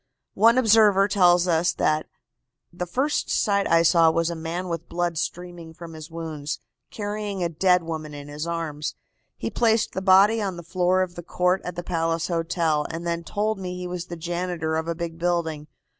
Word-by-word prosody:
One 230 +4 +5
observer 215 -4 +5
tells 180 -3 +4
us 170 0 +2
that 155 0 0 0.7
"the 180 0 -4
first 270 - -1
sight 200 -1 +1
I 165 0 +5
saw 165 0 +5
was 165 +1 0
a - - -4
man 165 +3 -4
with 170 -1 -5
blood 175 0 -1
streaming 170 0 -5
from 170 -1 -10
his 155 0 -9
wounds, 160 -3 -5 0.3
carrying 205 -2 -4
a 170 - 0
dead 180 +2 +3
woman 155 -2 -5
in 145 0 -9
his 150 +3 -5
arms. 160 -3 -3 0.4
He - - -4
placed 225 -1 +2
the 190 - -3
body 195 +4 +5
on 190 -4 -3
the 175 - -8
floor 180 +2 +1
of 180 -1 -6
the 175 - -7
court 180 +2 0
at 180 - -6
the 175 - -5
Palace 165 -1 -1
Hotel, 165 -3 0
and 165 +1 -5
then 170 0 -2
told 210 +4 -2
me 180 -1 -5
he 180 - -5
was 180 0 -5
the 175 - -7
janitor 170 -1 -2
of 160 0 -2
a 170 - -2
big 165 -1 -5
building. 165 -3 -1
175 Hz, 195 wpm, -24 LUFS, 165-185 Hz, 0.7 s, One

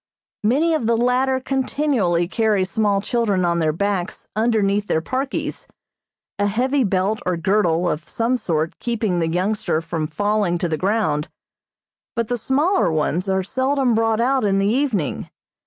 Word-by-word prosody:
Many 290 +10 +2
of 265 -8 0
the 230 0 +2
latter 255 +2 +2
continually 260 - 0
carry 210 -1 +1
small 200 0 0
children 210 -5 0
on 170 0 +1
their 160 -2 +2
backs 200 +3 -2
underneath 210 -2 +1
their - - +1
parkies, 260 - -3 0.7
a 205 - +2
heavy 260 +6 +1
belt 195 +1 0
or 180 -1 -1
girdle 180 -2 +1
of 165 0 -3
some 235 +2 0
sort 165 -8 -2
keeping 220 -7 -1
the 165 -1 0
youngster 185 0 0
from 165 -1 -3
falling 205 +2 0
to 175 - -1
the 160 - -1
ground, 185 -5 0 0.9
but 230 -2 -1
the 245 - 0
smaller 295 - +2
ones 160 +4 -1
are 190 0 +1
seldom 260 +4 +1
brought 225 0 +1
out 260 +2 +2
in 195 -2 +2
the 195 - +2
evening. 220 - 0
210 Hz, 155 wpm, -21 LUFS, 175-240 Hz, 0.9 s, Many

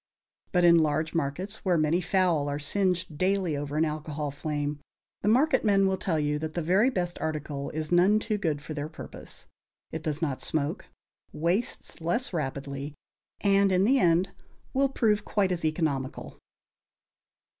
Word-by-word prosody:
But 180 -2 +3
in 170 -1 +7
large 155 0 0
markets, 175 +7 -2
where 180 -3 +2
many 155 +3 +2
fowl 175 -5 +1
are 145 - -2
singed 170 0 -1
daily 185 -4 +1
over 145 +1 -3
an 160 - +3
alcohol 150 -1 -3
flame, 145 0 -3 0.4
the - - -2
marketmen 220 -6 +4
will 190 -1 0
tell 165 -4 0
you 150 0 0
that 155 0 -5
the 175 - 0
very 190 +9 +4
best 175 -7 -2
article 150 -3 -3
is 155 +1 -4
none 180 +4 +5
too 215 -1 -1
good 150 -6 -1
for 155 - -6
their 150 0 -4
purpose. - - -9 0.5
It 160 - -4
does 155 -1 -2
not 145 -6 -2
smoke, 150 -2 -2 0.5
wastes 175 +3 -2
less 175 +8 -1
rapidly, 140 -1 -4 0.5
and 200 -1 +4
in 185 0 +3
the 265 +4 +4
end 175 0 +3 0.4
will 275 +1 +3
prove 215 -5 +1
quite 200 -3 +1
as 175 -2 -2
economical. 155 -4 -2
165 Hz, 160 wpm, -28 LUFS, 150-190 Hz, 0.5 s, in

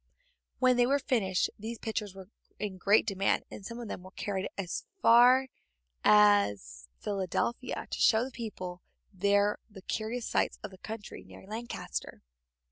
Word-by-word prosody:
When 255 -1 +4
they 245 0 +4
were 280 +2 +3
finished 205 -9 0
these 225 +3 -5
pictures 210 -3 -4
were 190 -1 -10 0.3
in 195 -3 -5
great 205 +4 +4
demand, 195 -2 +1
and - - -9
some 230 +4 -7
of 235 - -6
them 180 - -6
were 185 - -11
carried 190 0 -3
as 185 -3 -3 0.2
far 250 +1 +6 0.6
as 105 - +4
Philadelphia, 205 +5 -2
to - - -5
show 225 +1 +4
the 265 - -8
people 185 -7 -6 0.3
there 200 +2 +2
the 195 -3 -13
curious 225 +3 -3
sights - - 0
of - - -6
the 190 - -14
country 220 0 -8
near - - -14
Lancaster. 225 +4 -6
210 Hz, 155 wpm, -30 LUFS, 190-235 Hz, 0.6 s, far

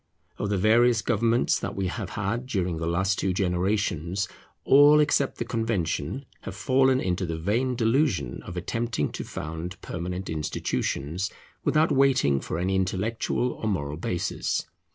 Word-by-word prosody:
Of 105 - -1
the 100 - +1
various 115 +3 +4
governments 115 +1 +2
that 100 - -4
we 95 - -1
have 95 +1 -3
had 110 +5 -2
during 90 -8 -1
the 80 0 -3
last 95 +3 +1
two 95 - 0
generations, 95 -1 0 0.4
all, 145 +2 +7
except 145 -2 +2
the 120 - -3
Convention, 115 - -2 0.2
have 95 - -7
fallen 130 +4 +3
into 95 -4 -1
the 80 -2 -2
vain 115 +10 0
delusion 115 - +1
of 90 - -8
attempting 115 -2 -1
to - - -5
found 80 +4 -6
permanent 90 +2 -4
institutions, 80 +2 -2 0.3
without 155 +2 +3
waiting 135 - +3
for 80 - -4
any 95 +2 0
intellectual 105 +6 0
or 110 - -5
moral 75 -7 -2
basis. 85 +2 -2
95 Hz, 150 wpm, -26 LUFS, 90-120 Hz, 0.4 s, all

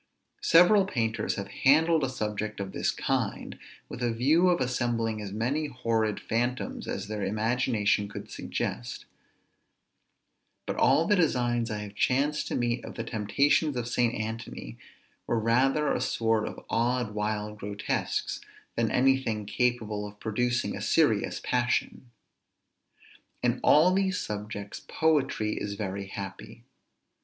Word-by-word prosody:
Several 180 +4 +6
painters 115 - -1
have 100 0 -5
handled 160 +3 +5
a 135 - +1
subject 110 -3 -3
of 100 -1 -4
this - - -1
kind, - - -2 0.3
with - - -8
a 120 -1 +1
view 150 +10 +3
of 175 - +2
assembling 120 -3 -1
as 100 -2 -6
many 130 +9 -1
horrid 115 -5 -1
phantoms 120 +2 -2
as - - -4
their 105 -1 -3
imagination 110 -1 +1
could - - -8
suggest; - - -4 1.6
but - - -3
all 160 - +4
the 205 - +3
designs 120 - +1
I 105 -1 -3
have 100 -1 -9
chanced 140 +7 +1
to - - -2
meet 120 -1 0
of - - -8
the 115 - -3
temptations 125 +7 +1
of 120 -1 -2
St. 120 -1 +1
Anthony 110 - -6 0.5
were 120 - +1
rather 130 +6 +2
a - - -1
sort 115 -1 +1
of - - -8
odd, 120 -1 0
wild 105 0 -3
grotesques, 100 0 -2 0.3
than - - +1
any 135 +1 +3
thing 110 -4 -3
capable 110 -2 -1
of 105 0 -13
producing 120 +2 -1
a - - -6
serious - - +2
passion. 125 0 -1 1.3
In - - +1
all 165 +5 +6
these 190 -1 +1
subjects 105 -1 -5
poetry 140 -9 +1
is 100 0 -3
very 100 -1 -4
happy. 105 +4 -8
115 Hz, 140 wpm, -28 LUFS, 105-130 Hz, 1.6 s, Several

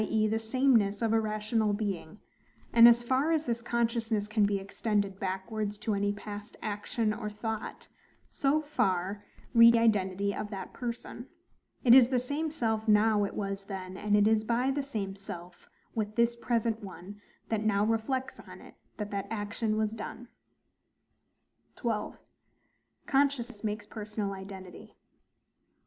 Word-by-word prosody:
e. 215 0 +1
the 220 +1 0
sameness 225 -3 +2
of 225 -1 +2
a 225 - +4
rational 215 0 0
being: 200 -4 -3 0.6
and 235 0 +10
as 235 0 +6
far 265 +6 +1
as 320 -1 +1
this 235 -1 -1
consciousness 230 -3 0
can 215 -1 +2
be 200 -1 0
extended 200 0 -2
backwards 200 +2 -3
to 215 +1 -2
any 205 0 +1
past 205 0 -8
action 215 +1 -1
or 210 0 -4
thought, 215 +1 -5 0.4
so 280 +2 +1
far 205 -8 -1 0.3
reaches 230 0 +8
the 230 - +4
identity 200 -3 +1
of 210 - -4
that 195 -3 -7
person; 240 0 -6 0.6
it 240 - +7
is 255 -2 +8
the 260 - +2
same 285 +6 -1
self 225 -7 -1
now 210 -1 +4
it - - -6
was 195 -1 -3
then; 190 -2 -6
and 210 +1 +1
it 205 0 +5
is 220 -1 +3
by 240 +4 +1
the 285 +1 -1
same 210 -8 -4
self 180 -3 -9 0.2
with 215 -1 -3
this 235 0 +3
present 230 -2 -1
one 195 +2 -10 0.3
that 220 -1 0
now 205 -1 +2
reflects 225 +4 -1
on - - -12
it, - - -14 0.2
that 210 -1 -5
that 200 -1 -3
action 215 0 -2
was 215 -1 +1
done. 225 +2 -7 1.5
12. 225 -3 -2 0.9
Consciousness 270 -6 +1
makes 210 -1 -3
personal 210 -1 -4
Identity. 190 -1 -10
215 Hz, 155 wpm, -30 LUFS, 205-235 Hz, 1.5 s, and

